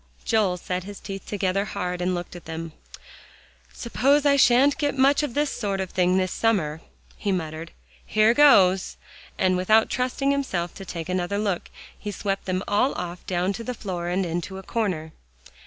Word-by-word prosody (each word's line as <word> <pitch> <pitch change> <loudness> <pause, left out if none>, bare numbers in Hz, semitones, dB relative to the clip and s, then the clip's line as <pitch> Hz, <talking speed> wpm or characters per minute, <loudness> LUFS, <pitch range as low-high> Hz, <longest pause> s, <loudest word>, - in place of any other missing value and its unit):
Joel 210 -5 +2
set 180 +1 -4
his 200 +1 -9
teeth 195 -1 -8
together 195 -1 0
hard, 180 -3 -4
and 180 +1 0
looked 175 0 -6
at 175 - -10
them. 165 0 -6 1.0
"Suppose 275 +5 +1
I 285 -1 +5
shan't 275 +3 +4
get 290 -2 0
much 275 +3 +4
of 295 -6 -3
this 295 0 +1
sort 200 -4 -2
of 190 -1 -3
thing 180 0 +2
this 185 -1 0
summer," 165 -9 0 0.4
he 205 - -1
muttered. 160 -2 -3 0.3
"Here 215 +2 +3
goes!" 195 -10 +5 0.4
and 185 -1 +2
without 215 +5 +3
trusting 255 +2 0
himself 190 -12 -2
to 195 - -9
take 170 -2 -6
another 185 +2 -1
look, 200 -4 -2 0.3
he 210 - -7
swept 195 0 -3
them 185 0 -1
all 210 +7 +2
off 175 0 -5
down 180 +1 0
to 230 - -6
the 250 +1 -4
floor 180 -5 -4
and 180 +2 0
into 175 +3 -4
a 190 - -8
corner. 180 -9 -2
195 Hz, 180 wpm, -24 LUFS, 180-230 Hz, 1.0 s, I